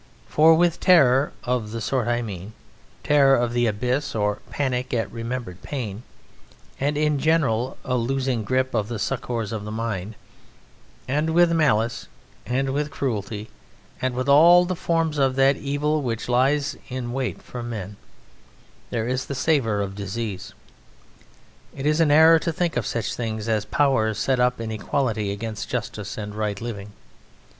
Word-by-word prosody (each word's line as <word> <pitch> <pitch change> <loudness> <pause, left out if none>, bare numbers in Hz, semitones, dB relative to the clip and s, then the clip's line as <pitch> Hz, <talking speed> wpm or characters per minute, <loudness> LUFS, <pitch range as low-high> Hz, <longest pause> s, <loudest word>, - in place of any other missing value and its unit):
For 160 +2 +5
with 170 0 +2
terror 140 -6 +5
(of 120 -3 -1
the 115 +2 -5
sort 125 +1 -1
I 120 0 0
mean 100 -1 -7 0.5
terror 140 -2 +5
of 120 -1 0
the 120 0 +2
abyss 125 +6 -1
or 105 -1 0
panic 130 -3 -2
at 115 - -1
remembered 115 -5 -5
pain, 115 -7 -5 0.8
and 145 +2 0
in 150 -1 +1
general, 135 -6 +1
a 125 - 0
losing 130 -1 -1
grip 130 +4 0
of 110 -3 0
the 120 0 -4
succours 115 -1 -3
of 110 -2 -4
the 105 - -6
mind), 110 -2 -4 0.9
and 150 +4 0
with 175 -1 +5
malice, 120 -9 +1 0.4
and 135 +2 0
with 145 +2 -1
cruelty, 110 -6 -4 0.5
and 130 -1 -1
with 130 +2 -2
all 170 +5 +7
the 185 +1 -2
forms 165 -3 0
of 135 -1 +2
that 135 +1 +4
Evil 145 +2 -1
which 115 -4 -3
lies 140 +4 +2
in 125 -2 -4
wait 130 -1 -2
for 125 - -8
men, 105 -4 -6 0.9
there 115 -2 -2
is 130 +1 -2
the 140 - -4
savour 130 -7 +1
of 100 -1 -3
disease. 100 0 -5 1.2
It 135 - -5
is 150 +1 +2
an 165 -2 +4
error 160 +2 +7
to 165 - -2
think 170 +1 -1
of - - -1
such 115 -4 -2
things 110 -2 -4
as 110 -2 0
power 120 -7 +2
set 130 +4 0
up 125 0 +2
in 115 -1 -4
equality 110 -2 -1
against 110 +1 -5
justice 105 -4 -4
and 105 -1 -5
right 105 -2 -2
living. 105 -3 -6
125 Hz, 165 wpm, -23 LUFS, 110-140 Hz, 1.2 s, all